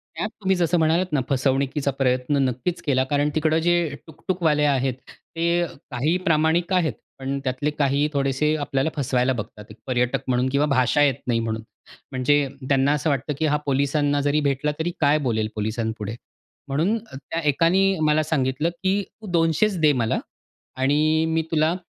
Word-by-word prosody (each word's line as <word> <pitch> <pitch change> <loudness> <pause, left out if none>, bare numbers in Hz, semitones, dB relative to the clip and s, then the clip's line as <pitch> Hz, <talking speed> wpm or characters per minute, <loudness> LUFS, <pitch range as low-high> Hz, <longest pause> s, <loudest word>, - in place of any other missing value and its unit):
त्यात 215 - -2
तुम्ही 190 -1 +2
जसं 175 -1 +1
म्हणालात 165 +3 +2
ना 140 - +2
फसवणुकीचा 135 +1 0
प्रयत्न 130 +1 +1
नक्कीच 130 +8 -3
केला, 130 -3 +1
कारण 145 0 +1
तिकडं 155 0 +2
जे 175 0 +4 0.3
टुक-टुकवाले 160 -2 0
आहेत, 135 -2 +1 0.4
ते 170 +1 +1 0.3
काही 150 +9 +1
प्रामाणिक 165 +3 +2
आहेत, 165 -7 +2 0.3
पण 135 +1 -3
त्यातले 135 +3 -1
काही 145 0 +1
थोडेसे 140 +2 +1
आपल्याला 145 -1 -1
फसवायला 130 -2 +1
बघतात. 105 -2 -7 0.2
पर्यटक 125 +1 0
म्हणून 125 0 +1
किंवा 140 +2 +2
भाषा 135 0 +2
येत 140 -3 +3
नाही 120 -2 +1
म्हणून. 110 -1 -3 0.5
म्हणजे 140 +2 +2 0.2
त्यांना 135 +1 +3
असं 150 +1 0
वाटतं 140 +1 -1
की 160 - +1
हा 150 0 +2
पोलिसांना 145 +1 +1
जरी 145 +1 +1
भेटला 140 +1 0
तरी 175 +2 -1
काय 145 0 +4
बोलेल 110 -2 0
पोलिसांपुढे? 110 0 -3 0.5
म्हणून 165 +11 +1
अ, - - -9
त्या 165 +4 -5
एकाने 185 +5 +3
मला 155 +1 +3
सांगितलं, 150 +1 0
की 195 +2 +2 0.2
तू 215 - -9
200च 170 +4 +2
दे 155 -2 +5
मला 110 - 0 0.6
आणि 155 +4 +2
मी 160 0 +1
तुला 160 +2 +2
145 Hz, 160 wpm, -23 LUFS, 130-160 Hz, 0.6 s, दे